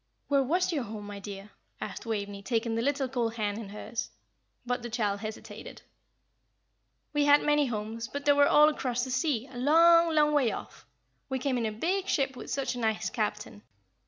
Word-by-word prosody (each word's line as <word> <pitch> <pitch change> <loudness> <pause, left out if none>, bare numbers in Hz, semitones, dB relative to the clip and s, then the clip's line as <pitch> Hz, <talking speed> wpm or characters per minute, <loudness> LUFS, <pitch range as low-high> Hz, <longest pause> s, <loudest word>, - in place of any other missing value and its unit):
"Where 280 -1 +4
was 345 +7 +1
your 295 - 0
home, 210 0 -7
my 205 -1 -7
dear!" 200 0 -8 0.3
asked - - -6
Waveney, 205 -2 -3
taking 230 +1 -1
the 225 - 0
little 275 +1 0
cold 240 -3 -2
hand 210 -1 -2
in 215 -4 -7
hers; 215 +3 -5 0.6
but 245 0 -1
the 240 - -6
child 210 -4 -1
hesitated. 215 +1 -8 1.3
"We 295 -1 +2
had 290 0 +6
many 295 -1 +3
homes, 225 0 -4
but 285 +3 -6
they 290 - +6
were 285 0 +5
all 300 0 +7
across 250 -5 -1
the 260 - -4
sea, 255 -2 0
a 255 -2 -11
long, 335 +4 +5
long 300 0 +4
way 270 -6 +3
off. - - -9 0.4
We 265 - -1
came 260 0 -1
in 235 -2 0
a - - -2
big 365 - -1
ship, 270 -2 0
with - - -9
such 265 -2 -1
a 245 - -6
nice 220 -2 -1
captain. - - -3
245 Hz, 195 wpm, -29 LUFS, 220-285 Hz, 1.3 s, all